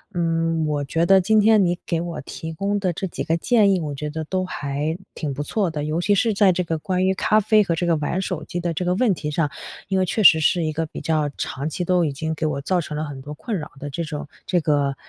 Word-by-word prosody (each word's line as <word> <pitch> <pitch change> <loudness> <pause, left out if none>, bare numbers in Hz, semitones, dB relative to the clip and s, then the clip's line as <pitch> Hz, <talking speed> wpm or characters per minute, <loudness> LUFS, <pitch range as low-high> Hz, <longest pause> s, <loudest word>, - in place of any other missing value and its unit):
嗯， 165 -1 0
我 150 -1 -1
觉 165 +5 0
得 190 +2 +6
今 215 +4 +3
天 215 -1 +5
你 175 -1 +1
给 165 -2 -1
我 170 -1 -5
提 160 - -7
供 200 +5 -1
的 190 -2 0
这 190 - -4
几 180 - -4
个 165 +1 +1
建 210 +1 +3
议， - - 0
我 150 -3 -4
觉 150 +2 -4
得 160 +1 -4
都 185 +4 -2
还 150 -2 -3 0.2
挺 150 -3 -4
不 145 - -3
错 195 +4 0
的， 150 -2 -4
尤 155 +3 -1
其 205 +3 +3
是 225 +2 +2
在 200 -1 +5
这 180 +1 0
个 165 -2 -2
关 185 +3 0
于 190 - +3
咖 215 +3 +2
啡 215 0 +4
和 175 -4 0
这 175 - -1
个 170 -1 +3
玩 150 +4 -1
手 175 -5 -3
机 175 - -4
的 175 -1 -2
这 180 - -2
个 180 0 +1
问 220 0 +3
题 150 -3 -4
上， 150 -1 0 0.4
因 190 0 +1
为 185 - +2
确 210 +4 -1
实 160 -3 +8
是 165 +3 +2
一 155 -1 -1
个 165 - -1
比 - - -8
较 155 -2 0
长 140 +3 -3
期 175 +3 -3
都 180 0 +3
已 150 - 0
经 160 +3 -3
给 160 - -5
我 145 -2 -2
造 180 +4 +1
成 150 -1 -6
了 155 - -2
很 140 -3 -7
多 145 +2 -9
困 220 - -4
扰 150 - -7
的 145 - -6
这 170 +5 -3
种 155 -1 -5 0.3
这 185 -4 +1
个 145 -3 +1
165 Hz, 300 characters per minute, -22 LUFS, 150-185 Hz, 0.4 s, 实